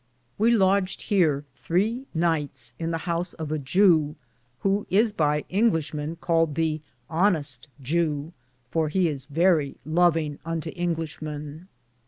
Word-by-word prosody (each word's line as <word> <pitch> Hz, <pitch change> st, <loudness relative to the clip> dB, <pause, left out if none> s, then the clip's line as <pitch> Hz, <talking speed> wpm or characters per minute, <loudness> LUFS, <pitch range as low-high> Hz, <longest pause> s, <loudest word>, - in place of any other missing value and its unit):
We 225 Hz, +2 st, +4 dB
lodged 195 Hz, -4 st, +2 dB
heare 155 Hz, -8 st, +2 dB
3 210 Hz, -, 0 dB
nyghtes 150 Hz, -7 st, -1 dB
in 165 Hz, 0 st, -2 dB
the 165 Hz, -, -1 dB
house 170 Hz, 0 st, -2 dB
of 155 Hz, -2 st, -5 dB
a 155 Hz, -, 0 dB
Jew, 155 Hz, 0 st, +3 dB, 0.5 s
who 200 Hz, +1 st, +1 dB
is 215 Hz, +4 st, +3 dB
by 150 Hz, -5 st, +1 dB
Inglishe 180 Hz, -7 st, +1 dB
men 150 Hz, +2 st, -3 dB
caled 165 Hz, -3 st, +1 dB
the 160 Hz, -1 st, 0 dB, 0.3 s
honeste 160 Hz, -7 st, +1 dB
Jew, 150 Hz, +1 st, -1 dB, 0.4 s
for 160 Hz, -2 st, +1 dB
he 185 Hz, +2 st, +2 dB
is 140 Hz, -4 st, -3 dB
verrie 155 Hz, -1 st, +2 dB
lovinge 160 Hz, -2 st, +2 dB
unto 165 Hz, -1 st, -3 dB
Inglishe 165 Hz, -3 st, -3 dB
men. 150 Hz, +2 st, -7 dB
165 Hz, 140 wpm, -25 LUFS, 150-180 Hz, 0.5 s, We